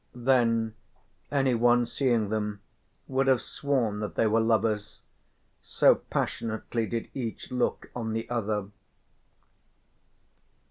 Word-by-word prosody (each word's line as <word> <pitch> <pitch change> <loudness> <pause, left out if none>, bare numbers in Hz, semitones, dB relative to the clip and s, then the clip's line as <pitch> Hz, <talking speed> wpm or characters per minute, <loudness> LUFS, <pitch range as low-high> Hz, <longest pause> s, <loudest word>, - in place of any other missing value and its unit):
Then 120 -3 +2 0.6
anyone 120 -3 +3
seeing 115 -4 +1
them 105 -1 -2 0.5
would 135 0 +1
have 130 -2 +5
sworn 125 -8 -1
that 105 - -4
they - - +2
were 110 +1 +3
lovers, 110 -2 0 0.6
so - - +4
passionately 115 0 -3
did 115 -1 -4
each 120 -5 -5
look 125 -1 -1
on 115 -2 -3
the 115 +1 -3
other. 105 -4 -2
115 Hz, 105 wpm, -28 LUFS, 110-125 Hz, 0.6 s, have